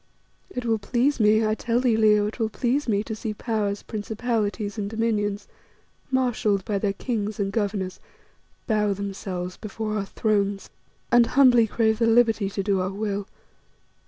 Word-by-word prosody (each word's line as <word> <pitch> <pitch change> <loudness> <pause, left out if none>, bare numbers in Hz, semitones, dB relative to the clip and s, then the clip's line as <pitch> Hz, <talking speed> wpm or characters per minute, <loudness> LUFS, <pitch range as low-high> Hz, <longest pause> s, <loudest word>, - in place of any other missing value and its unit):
It 250 -10 -5
will 225 -2 +1
please 250 +7 +1
me, 215 +1 +4
I 215 - +2
tell 235 +2 0
thee, 245 -3 +2
Leo, 210 -1 +4
it 215 +4 -5
will 220 -1 +1
please 260 +6 -1
me, 205 -2 +1
to 220 0 -5
see 215 -1 -4
Powers, 210 -3 -2
Principalities 215 -1 -2
and 200 -1 -2
Dominions, 215 -2 -1 0.6
marshalled 240 -7 +1
by 205 -2 -1
their 200 -1 0
kings 215 -1 -3
and 195 -1 0
governors, 200 -3 -2 0.7
bow 210 -3 +1
themselves 190 -2 -5
before 215 0 -4
our 200 - -3
thrones 200 -1 -1 0.4
and 240 -1 +6
humbly 250 -4 +5
crave 220 0 +1
the 230 - +3
liberty 225 -3 +3
to 195 0 -3
do 195 -2 +1
our 185 - -1
will. 200 0 -3
215 Hz, 160 wpm, -25 LUFS, 200-230 Hz, 0.7 s, and